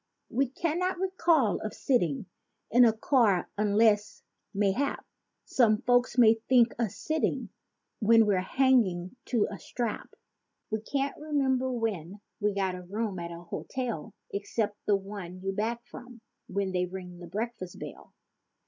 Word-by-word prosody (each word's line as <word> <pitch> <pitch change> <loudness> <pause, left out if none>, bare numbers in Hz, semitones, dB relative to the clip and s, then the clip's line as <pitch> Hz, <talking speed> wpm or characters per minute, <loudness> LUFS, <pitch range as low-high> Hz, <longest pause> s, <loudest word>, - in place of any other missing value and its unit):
We 270 +3 +2
can't 345 +6 -1
recall 335 - +2
of 215 - -5
sitting 175 - +1 0.5
in 245 +1 +7
a 230 - +6
car 220 -5 +2
unless, 210 0 +2 0.3
mayhap 205 +7 0 0.4
Some 230 -2 +3
folk 245 0 +4
may 225 -2 +6
think 245 -2 +5
us 225 -5 -1
sitting 315 0 -1 0.5
when 225 0 +6
we're 195 -3 +2
hanging 200 -5 +2
to 235 -4 +1
a 200 - -7
strap. 235 -3 -4 0.6
We 220 0 -1
can't 275 +4 -2
remember 265 -4 +1
when 210 -6 -3 0.2
we 205 -1 0
got 190 -2 0
a 180 - -6
room 200 +1 -3
at 170 0 -5
a 170 0 -8
hotel 230 +2 -5 0.2
Except 205 +1 -1
the 205 - +5
one 195 -2 -6
you 195 - -1
back 230 +4 -2
from 245 -1 -11 0.3
when 195 0 -1
they 180 -1 0
ring 180 -1 -8
the 175 - -9
breakfast 205 -1 -5
bell. - - -9
220 Hz, 145 wpm, -29 LUFS, 195-250 Hz, 0.6 s, in